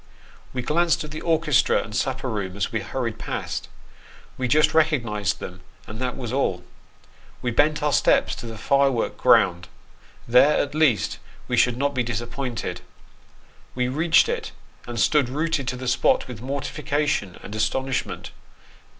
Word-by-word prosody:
We 125 -1 -4
glanced 165 +5 +2
at 155 - -8
the 155 - -6
orchestra 160 -4 +2
and 105 - -8
supper 130 +1 -1
room 100 -5 -3
as 100 - -1
we 115 - -1
hurried 115 +1 -4
past - - -4 0.7
we 130 - -2
just 155 +4 +4
recognised 120 -11 +1
them, 90 0 -8 0.2
and 110 +1 -8
that 125 -1 -2
was 125 -3 -5
all. 95 -10 0 0.8
We 120 - 0
bent 150 +5 +2
our 150 -1 +1
steps - - +3
to 120 - -7
the 115 -1 -7
firework 135 +1 +1
ground; 85 -1 +3 0.6
there, 125 +5 +5
at 145 - -1
least, 150 - +2 0.3
we - - 0
should 125 -1 +3
not 140 +2 0
be 130 - 0
disappointed. 120 +1 -4 0.9
We 125 0 0
reached 160 - +4
it, 465 -2 -3 0.3
and 120 -1 -4
stood 140 +1 +3
rooted 155 0 -1
to 125 - -1
the 125 0 -6
spot 120 0 +2
with 120 -4 -8
mortificatio 140 - -2
r - - -14
and 100 - -8
astonishment. 110 -3 -2
130 Hz, 160 wpm, -24 LUFS, 115-150 Hz, 0.9 s, there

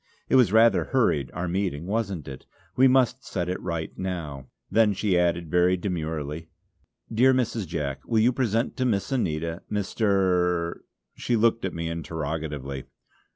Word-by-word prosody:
It - - +3
was 125 -7 +5
rather 110 -1 +5
hurried 85 - +1
our 90 +2 -3
meeting; 85 -4 -2
wasn't 100 -5 -2
it? 65 -1 -9 0.3
We 130 +1 +6
must 130 0 +3
set 90 -2 -3
it 90 +1 -3
right 85 -3 -4
now." 80 -8 -4 0.2
Then 110 -2 +4
she 100 -1 0
added 85 -2 +1
very 90 +1 +3
demurely: 80 -4 -4 0.7
"Dear 130 +4 +5
Mrs. 115 -5 -1
Jack, 75 -5 -3
will 115 - +1
you 115 +4 +4
present 115 -2 0
to 130 - 0
Miss 100 -4 0
Anita, 85 - -1
Mr. 95 -5 +1 0.2
" - - -57
she 120 - 0
looked 115 -1 +2
at 95 - -4
me 85 0 -3
interrogatively. 75 -4 -4
90 Hz, 155 wpm, -26 LUFS, 80-110 Hz, 0.7 s, We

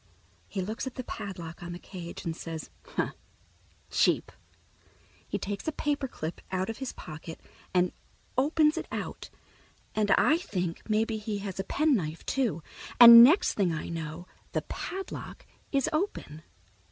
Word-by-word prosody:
He 195 - -3
looks 220 +7 -4
at 260 - -6
the 255 - -4
padlock 175 -7 -7
on 175 0 -6
the - - -6
cage 175 -2 -8
and 165 -1 -2
says, 165 -2 -6
"Huh, - - -2 0.8
cheap!" - - +2 1.0
He - - -2
takes 200 +4 -5
a - - +2
paper 290 -2 -1
clip 160 -8 -6
out 185 +3 -1
of 225 - -10
his 265 -2 -3
pocket 160 +1 -9 0.3
and 180 0 +3 0.4
opens 300 +3 +3
it - - -6
out, - - -5 0.6
and 210 -1 +1
I 315 - +5
think 180 - -4
maybe 220 +1 +1
he 210 -1 -3
has 195 -1 -5
a - - 0
penknife, 200 - 0
too, 215 - 0 0.4
and 235 -1 +13
next 310 +11 +5
thing 190 -4 +1
I 160 -1 -4
know 165 +1 -5 0.3
the - - 0
padlock 385 0 -6 0.3
is 275 -2 +2
open. 310 - -2
205 Hz, 155 wpm, -29 LUFS, 170-265 Hz, 1.0 s, and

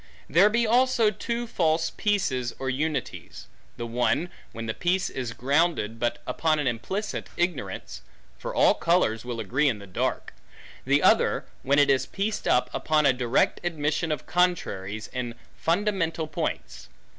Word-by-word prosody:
There 180 +8 +5
be 235 +2 +2
also 240 -1 +3
two 235 +2 -3
false 165 -6 +1
peaces, 180 - -1
or 135 -1 -2
unities: 145 -1 -4 0.3
the 120 - -4
one, 125 +9 0 0.2
when 115 0 -6
the 110 - -2
peace 180 +6 0
is 125 -3 -4
grounded, 135 -2 0
but 120 0 -1
upon 155 +5 +1
an 150 - -1
implicit 130 - -3
ignorance; 145 - -3 0.4
for - - -4
all - - +5
colors 165 -11 +1
will 120 -1 -5
agree 130 +8 +1
in 115 - -1
the 100 - -11
dark: 95 - -2 0.5
the - - +3
other, - - +3 0.2
when 140 +2 +2
it 145 -1 +5
is 135 - +1
pieced 205 +2 -2
up, 125 - +3
upon 155 -1 +1
a 135 - +5
direct 125 0 +1
admission 155 -1 -1
of 150 - -3
contraries, 110 - 0
in 120 -2 -4 0.2
fundamental 170 -3 0
points. 155 -1 -4
150 Hz, 155 wpm, -26 LUFS, 120-180 Hz, 0.5 s, There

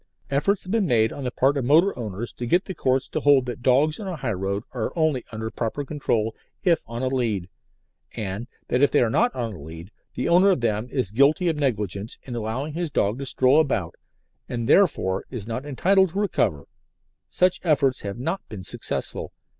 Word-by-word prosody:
Efforts 185 +9 +1
have 185 - -6
been 220 -4 +2
made 110 -4 +3
on 140 - -7
the - - 0
part 135 +3 +2
of 135 - -1
motor 165 +9 +4
owners 110 -1 -5
to 120 - -5
get 175 +8 +2
the 190 - -5
Courts 130 -5 0
to - - -3
hold 140 -3 +4
that 120 -2 -6
dogs 140 - +3
on 205 - -6
a 185 - -3
high 130 -7 -2
road 100 +2 -2
are 115 -4 -3
only 155 -7 +1
under 110 0 -5
proper 120 +5 -3
control 115 -7 -1 0.3
if 170 -4 +3
on 115 +3 -5
a - - +1
"lead," 115 -9 -1 0.7
and 105 +3 -4 0.2
that 125 - +1
if 145 - +5
they - - +3
are 115 - 0
not 240 - +3
on 115 -3 -3
a 90 - -10
"lead" 80 +5 -10 0.2
the 125 - -1
owner 180 +3 +5
of 180 -10 +2
them 110 0 0
is 125 -9 -1
guilty 145 - +3
of 160 - 0
negligence 105 -6 -1
in 125 - -7
allowing 120 +7 -3
his 170 0 -2
dog 110 -3 0
to 135 - -5
stroll 130 +4 +4
about, 110 - 0 0.6
and 120 -2 -3
therefore 95 - +3
is 120 -6 -6
not 120 +5 -5
entitled 190 +7 +3
to 190 +5 -4
recover: 100 - 0 0.6
such 185 0 +1
efforts 145 -6 +2
have 100 +1 -5
not 135 +10 -2
been 100 -4 -7
successful. - - -3
130 Hz, 210 wpm, -24 LUFS, 110-155 Hz, 0.7 s, if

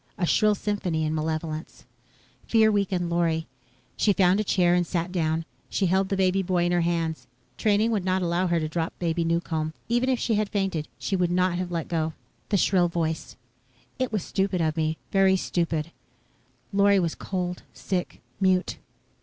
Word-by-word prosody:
A 185 - +1
shrill 210 +4 +3
symphony 185 -6 -1
in 155 - -1
malevolence. 155 0 -4 0.6
Fear 220 -1 +4
weakened 190 -4 0
Lorry. 165 -1 +1 0.5
She 205 - +3
found 185 +1 +3
a - - +2
chair 180 -3 +3
and 175 -1 +2
sat 175 +1 -2
down. 160 -2 0 0.2
She 195 - 0
held 190 +2 +2
the 200 - 0
boy 190 -1 +3
baby 180 -2 +1
in 175 - +1
her 175 0 +2
hands. 165 -1 -1 0.3
Training 215 +2 +2
would 210 -4 0
not 185 0 +1
allow 175 +2 +1
her 170 -1 +2
to 155 - -2
drop 165 +1 -3
Baby 170 -1 0
Newcomb. 165 -2 -1
Even 240 +2 +2
if 255 - +2
she 230 - 0
had 210 -1 +1
fainted, 195 -7 -1
she 195 - -2
would 180 -2 +1
not 180 0 +1
have 180 -1 -3
let 170 -2 -3
go. 160 -1 -1 0.4
The 200 - +2
shrill 180 -1 +3
voice: 165 -2 -3 0.6
"It 255 -2 0
was 210 -5 -1
stupid 190 -2 -1
of 155 -2 +1
me. 160 0 0
Very 195 -1 +4
stupid." 170 -3 -1 0.8
Lorry 200 0 +5
was 170 -3 0
cold, 180 -2 -4
sick, 180 -2 -4 0.2
mute. 185 -1 +1
180 Hz, 180 wpm, -26 LUFS, 165-195 Hz, 0.8 s, Lorry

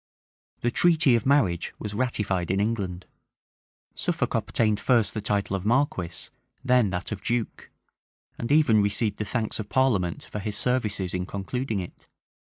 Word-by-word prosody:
The 120 - +1
treaty 155 -4 +4
of 115 +2 0
marriage 100 - +2
was 105 -1 -6
ratified 105 -6 -1
in 95 +1 +1
England: 100 -4 -2 0.9
Suffolk - - -1
obtained 110 -3 +1
first 115 -2 +2
the 110 - -3
title 100 -1 0
of 95 - -4
marquis, 110 -7 0 0.3
then 125 -5 +3
that 90 +2 -4
of 100 -1 -5
duke; 120 -1 -2 0.7
and 115 - -4
even 145 -8 +5
received 100 +2 0
the 105 - -3
thanks 110 +1 -2
of 105 -1 -5
parliament 105 -10 +1
for 105 - -4
his 105 0 -2
services 105 -7 0
in 90 0 -2
concluding 105 +2 -3
it. 90 - -11
105 Hz, 155 wpm, -26 LUFS, 95-120 Hz, 0.9 s, even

